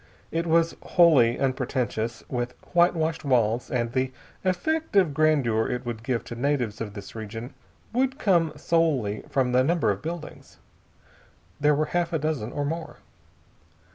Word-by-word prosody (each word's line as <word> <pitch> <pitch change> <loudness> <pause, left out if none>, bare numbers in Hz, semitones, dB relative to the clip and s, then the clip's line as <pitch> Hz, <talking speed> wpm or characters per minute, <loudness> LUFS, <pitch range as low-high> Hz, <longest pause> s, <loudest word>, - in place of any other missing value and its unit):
It 165 +1 -1
was 165 0 +3
wholly 145 -10 +5
unpretentious, 125 -4 -1
with 125 -1 -3 0.2
whitewashed 165 -2 +2
walls, 120 -4 +1
and 120 -2 -1
the 130 +1 0 0.3
effect 315 - -1
of 185 -7 +4
grandeur 140 -8 +2
it 125 +1 -3
would 115 -2 -4
give 120 0 -1
to 120 - -8
natives 125 -4 -1
of 105 -3 -5
this 100 -1 -9
region 115 +4 -7 0.4
would 265 +2 +1
come 175 - +2
solely 145 -11 +1
from 130 -2 +1
the 125 +1 +4
number 170 +3 +2
of - - -4
buildings. 165 0 -7 1.0
There 150 0 +4
were 155 +2 +1
half 175 -1 0
a - - +3
dozen 145 -7 -2
or 145 - -2
more. 165 +2 -4
140 Hz, 150 wpm, -26 LUFS, 120-165 Hz, 1.0 s, wholly